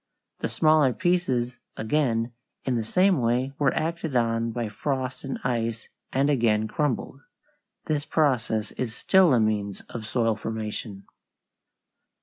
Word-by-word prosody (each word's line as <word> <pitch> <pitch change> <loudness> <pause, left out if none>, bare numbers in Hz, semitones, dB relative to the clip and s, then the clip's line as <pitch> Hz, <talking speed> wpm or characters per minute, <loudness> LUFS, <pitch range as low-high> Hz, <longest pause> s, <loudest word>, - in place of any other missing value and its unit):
The - - -2
smaller 155 -4 +4
pieces 135 -10 0 0.2
again, 115 -1 0 0.3
in 130 - +1
the 115 - 0
same 185 - +3
way, 120 +3 +1
were 140 -2 +3
acted 160 -2 -2
on 115 -1 +1
by 115 0 -2
frost 130 +4 -3
and 135 -1 -3
ice 115 -2 -2 0.2
and 135 +2 +2
again 115 -6 +2
crumbled. 140 +1 -2 0.6
This 150 -2 0
process 125 -9 +1
is 115 -3 -4
still 190 -4 +4
a 125 - +5
means 105 -2 0
of 110 -2 -6
soil 115 -1 +1
formation. 110 -2 -5
120 Hz, 135 wpm, -26 LUFS, 115-145 Hz, 0.6 s, a